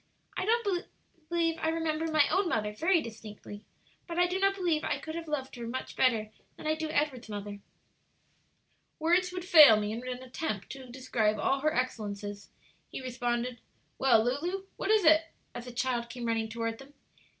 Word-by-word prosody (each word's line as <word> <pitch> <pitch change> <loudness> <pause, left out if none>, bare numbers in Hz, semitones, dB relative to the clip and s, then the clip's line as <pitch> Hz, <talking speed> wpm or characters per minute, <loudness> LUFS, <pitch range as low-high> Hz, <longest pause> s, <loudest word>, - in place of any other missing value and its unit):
"I 370 - -2
don't 420 -5 +1 0.9
remember 325 0 -1
my 305 -2 +5
own 380 -2 +2
mother 210 -6 -1
very 330 - +2
distinctly, 210 -2 -10 0.4
but 340 -1 -5
I 355 - +5
do 360 +2 -1
not 390 0 +3
believe 345 -5 0
I - - 0
could 315 - -7
have 335 0 -5
loved 270 -4 -3
her 235 -1 -5
much 255 +3 -5
better 225 -4 +2 0.3
than - - -10
I 310 - +2
do 315 0 -3
Edward's 285 -6 -1
mother." 205 -1 -6 1.4
"Words 355 +3 +2
would 360 -1 -5
fail 300 - +9
me 210 0 -2
in 225 +2 -4
an 250 0 -5
attempt 250 -6 -4
to 265 -1 -9
describe 230 -4 0
all 270 +6 +1
her 310 +3 +1
excellences," 205 -6 -3 0.4
he - - -6
responded. 245 -1 -2 0.4
"Well, 240 -5 +5
Lulu, 340 +11 -2
what - - -4
is 430 -4 +4
it?" 315 +1 +6 0.3
as 240 0 -7
the 250 - -7
child 240 -1 -1
came 240 0 -6
running 225 -1 0
toward 230 0 -3
them. 275 +2 -14
260 Hz, 175 wpm, -30 LUFS, 230-325 Hz, 1.4 s, fail